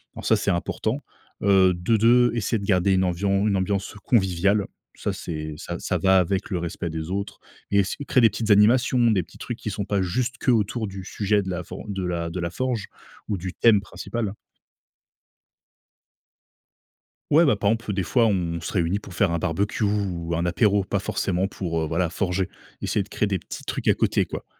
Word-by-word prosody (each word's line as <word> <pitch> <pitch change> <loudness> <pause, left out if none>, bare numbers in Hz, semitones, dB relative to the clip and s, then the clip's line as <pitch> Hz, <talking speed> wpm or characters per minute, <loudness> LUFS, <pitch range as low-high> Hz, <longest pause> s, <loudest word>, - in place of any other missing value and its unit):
Alors - - -8
ça, - - +4
c'est - - 0
important, 85 - -1 0.4
heu, 95 -2 +5
de 90 +6 +1
de 120 +2 +5
essayer 115 0 0
de 100 - -6
garder 95 0 +3
une 95 0 +3
amvian 100 +3 +1
une 100 - +2
ambiance 100 +2 -2
conviviale, 100 -2 +2 0.3
ça, - - -2
c'est 75 -2 -5
ça - - -5
ça - - -1
va 95 -1 +4
avec 95 +2 -1
le 90 - -1
respect 85 0 -4
des 80 +2 -5
autres 100 +1 -4 0.3
et 100 - +4
s 95 - -3
créer 130 - +4
des 115 - +7
petites 110 +2 -4
animations, 120 +3 +5
des 95 -5 +2
petits - - -17
trucs 120 -2 -5
qui 110 - -4
sont 100 +1 -3
pas 100 -2 0
juste 125 +8 -1
qu'autour 115 -3 +1
du 95 -1 -7
sujet 105 +1 0
de 95 - -5
la 90 -1 -3
for 90 - -8
de 95 -2 -3
la 85 -1 -2
de 90 +2 -5
la 85 0 -2
forge 120 +1 -2 0.4
ou 100 - 0
du 90 +1 -5
thème 110 -4 +4
principal. 110 0 -5 3.0
Ouais, 160 +4 +6
ben, 135 -9 +4
par 100 +1 +1
exemple, 115 -2 -2
des 95 -1 -1
fois, 115 +2 +3
on 85 -5 -1
se - - -5
réunit 90 +2 0
pour 95 -4 -11
faire 95 -4 +2
un 85 - 0
barbecue 100 +7 -1
ou 90 -5 -1
un 85 +1 -1
apéro, 100 +3 +2
pas 100 +1 -1
forcément 95 -1 -1
pour, 85 -5 -3
heu, 80 - -1
voilà, 85 +1 0
forger. 95 -1 -1 0.3
Essayer 105 - +1
de 100 - -7
créer 105 - 0
des 95 -3 -1
petits - - -9
trucs - - -4
à - - +5
côté, - - +1
quoi, - - -6
100 Hz, 205 wpm, -24 LUFS, 90-105 Hz, 3.0 s, des